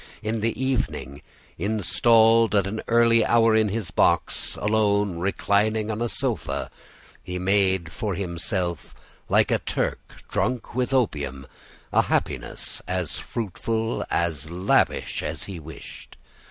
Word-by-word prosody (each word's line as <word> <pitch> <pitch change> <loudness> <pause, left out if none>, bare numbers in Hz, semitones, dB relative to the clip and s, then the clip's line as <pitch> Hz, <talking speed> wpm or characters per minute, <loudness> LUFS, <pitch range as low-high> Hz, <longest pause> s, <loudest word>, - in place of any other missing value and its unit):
In 110 +1 -1
the 115 +3 -1
evening, 115 - -2 0.4
installed 110 +3 +3
at 100 -2 +3
an 110 +3 -3
early 115 -1 +4
hour 115 -1 +4
in 110 -1 +3
his 105 -3 -4
box, - - +2
alone, 105 -4 +1
reclining 105 +3 +1
on 110 +1 -4
a 120 - 0
sofa, - - -3 0.5
he 90 - -5
made 95 -2 +1
for 105 0 -3
himself, 85 -1 -3 0.3
like - - +3
a - - +2
Turk - - -4
drunk 125 -1 -2
with 125 +2 -1
opium, 70 - -1 0.5
a - - +6
happiness - - -2
as 90 -3 -2
fruitful, 115 +1 -3
as 80 -3 -1
lavish, 90 +3 +1
as - - -4
he 95 -4 -6
wished. 80 -1 -11
105 Hz, 125 wpm, -24 LUFS, 90-115 Hz, 0.5 s, a